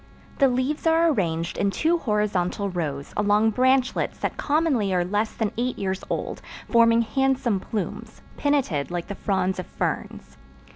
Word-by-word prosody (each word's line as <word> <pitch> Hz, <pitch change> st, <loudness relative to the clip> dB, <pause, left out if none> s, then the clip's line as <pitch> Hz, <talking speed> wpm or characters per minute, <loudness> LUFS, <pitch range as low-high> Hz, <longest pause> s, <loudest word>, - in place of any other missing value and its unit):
The 275 Hz, -, +6 dB
leaves 260 Hz, +5 st, -1 dB
are 325 Hz, 0 st, +4 dB
arranged 170 Hz, -, -1 dB
in 200 Hz, -, +2 dB
two 325 Hz, +11 st, +1 dB
horizontal 205 Hz, -, 0 dB
rows 145 Hz, -6 st, -4 dB
along 210 Hz, +1 st, +3 dB
branchlets 260 Hz, +2 st, +1 dB
that -, -, -3 dB
commonly 285 Hz, -9 st, +1 dB
are 175 Hz, -1 st, +1 dB
less 205 Hz, +4 st, 0 dB
than 220 Hz, -3 st, -2 dB
eight 250 Hz, +1 st, -1 dB
years 190 Hz, -1 st, -3 dB
old, -, -, -3 dB, 0.3 s
forming 230 Hz, 0 st, +5 dB
handsome 265 Hz, -4 st, +1 dB
plumes, 205 Hz, +1 st, -5 dB
pinnated 265 Hz, -, 0 dB
like 175 Hz, -1 st, -3 dB
the -, -, -2 dB
fronds 190 Hz, -2 st, -1 dB
of 185 Hz, -, -5 dB
ferns. 65 Hz, +1 st, -4 dB
210 Hz, 150 wpm, -24 LUFS, 185-260 Hz, 0.3 s, The